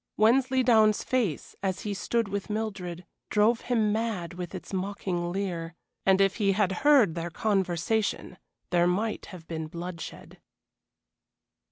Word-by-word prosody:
Wensleydown's 235 -2 +4
face, 230 - -1
as 190 -2 -1
he 210 - -3
stood 230 +3 0
with 200 +1 -4
Mildred, 190 -5 -4 0.2
drove 225 +2 +3
him 225 -4 +1
mad 215 -6 -2
with 180 +1 -6
its 185 - -8
mocking 185 -2 -2
leer, 175 -3 -3 0.3
and 190 0 +5
if 195 -1 +3
he 200 -3 +2
had 195 -1 +2
heard 275 - +5
their 170 +1 -4
conversation 195 +2 -1 0.3
there 175 0 +4
might 210 +5 -1
have 175 -4 -11
been 160 -1 -4
bloodshed. 170 +1 -8
195 Hz, 135 wpm, -28 LUFS, 175-220 Hz, 0.3 s, and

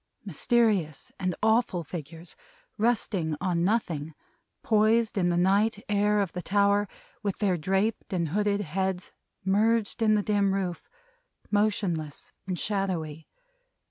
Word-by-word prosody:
Mysterious 195 - +1
and 185 -2 -1
awful 220 -5 +2
figures! 165 +2 -8 0.4
Resting 210 -8 0
on 175 -2 0
nothing; 165 -7 -1 0.5
poised 220 +1 +3
in 180 -3 +2
the 175 - +1
night 200 +4 +2
air 210 0 +2
of 195 -4 -2
the 180 - -4
tower, 200 +2 +2 0.3
with 200 -3 -2
their 195 -4 +1
draped 195 +6 -1
and 170 -4 -1
hooded 205 +3 +1
heads 190 +1 -2 0.3
merged 215 +3 +2
in 215 -1 +4
the 205 - +1
dim 200 -2 +2
roof; 180 -3 -3 0.6
motionless 195 -8 -1
and 185 -1 -2
shadowy. 170 -6 -2
195 Hz, 125 wpm, -27 LUFS, 175-210 Hz, 0.6 s, in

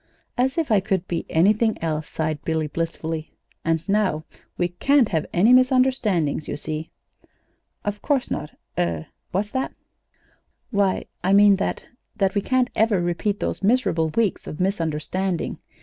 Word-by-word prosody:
"As 260 +4 +1
if 320 -7 0
I 210 - +6
could 190 -2 -1
be 170 - -3
anything 215 +6 +3
else," 155 -2 -2
sighed 155 -1 -2
Billy, 160 -1 0
blissfully. 160 0 -3 0.3
"And 165 0 0
now 195 -6 +1 0.3
we 175 -1 +1
can't 260 +7 +3
have 160 -5 -1
any 210 +8 +5
misunderstandings, 255 - +3
you - - -3
see." 155 +1 -5 1.0
"Of 205 0 -3
course 275 -4 0
not. 150 - -3 0.3
Er 85 -2 0 0.2
what's 205 +3 -1
that?" 260 0 -2 1.0
"Why, 200 -3 +1 0.2
I 190 +2 +3
mean 200 -1 +7
that 195 - -2 0.3
that 195 -3 +1
we 200 - +1
can't 255 +2 +1
ever 220 -3 +3
repeat 175 +4 -1
hose - - -2
miserable 195 -8 +2
weeks 215 +4 0
of 150 - -6
misunderstanding. 180 0 -1
190 Hz, 150 wpm, -23 LUFS, 160-215 Hz, 1.0 s, mean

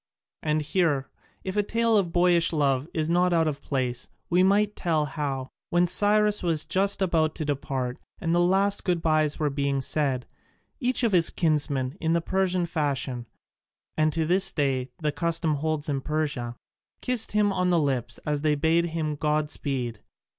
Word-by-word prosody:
And 155 0 0
here, 150 -4 0 0.3
if 190 +1 -4
a 210 - +3
tale 230 +2 +1
of 190 -5 +2
boyish 175 -1 +3
love 140 -3 +1
is 155 -1 -1
not 175 +1 +2
out 165 -1 +3
of 145 -2 -3
place, 130 -3 -2 0.2
we 180 +1 +4
might 205 +2 +3
tell 160 -4 0
how, 135 -3 -4 0.2
when 175 +1 +3
Cyrus 210 +3 +3
was 160 -3 +1
just 195 +5 +1
about 160 -4 +1
to 155 - -3
depart 135 -3 -3 0.2
and 165 -1 -1
the 175 - +3
last 195 +3 +2
good 175 -3 0
byes 155 -2 +2
were 150 -2 0
being 140 -1 -1
said, 135 -2 -1 0.5
each 255 -2 +1
of 230 - +3
his 175 -3 +4
kinsmen 150 -3 0
in 165 0 +1
the 170 - +3
Persian 185 +1 0
fashion 135 -7 -2 0.7
and 155 0 +2
to 160 0 -1
this 190 +4 +2
day 135 -3 -1
the 150 -1 -1
custom 165 0 0
holds 155 0 -2
in 140 -2 -1
Persia 140 -6 -2 0.5
kissed 250 -4 0
him 210 -1 +2
on 180 -1 +1
the 175 - +3
lips 130 -6 -1
as 150 -1 -1
they 150 -1 +2
bade 160 +3 +2
him 160 -2 -2
god 150 0 0
speed. 125 -6 -3
155 Hz, 175 wpm, -26 LUFS, 145-180 Hz, 0.7 s, we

